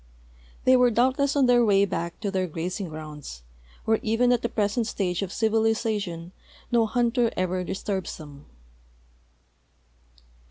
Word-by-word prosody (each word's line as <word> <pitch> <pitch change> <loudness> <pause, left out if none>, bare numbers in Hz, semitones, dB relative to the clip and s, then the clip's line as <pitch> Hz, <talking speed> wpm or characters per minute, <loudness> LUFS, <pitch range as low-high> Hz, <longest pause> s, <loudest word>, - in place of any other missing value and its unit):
They 255 - +6
were 250 -1 +5
doubtless 260 +5 +2
on 280 -2 +4
their 245 -1 +5
way 200 -2 +4
back 170 -3 -4
to 205 -3 -2
their 185 -1 0
grazing 175 +3 -4
grounds, 150 - -9 0.4
where 220 0 +2
even 230 +3 +2
at 245 -2 +2
the 235 - -1
present 215 +2 0
stage 180 -5 -2
of 195 -2 -3
civilization 220 -6 0 0.4
no 230 -2 +3
hunter 240 +1 +1
ever 185 0 0
disturbs 190 0 -4
them. 145 -2 -12
210 Hz, 135 wpm, -25 LUFS, 180-235 Hz, 0.4 s, They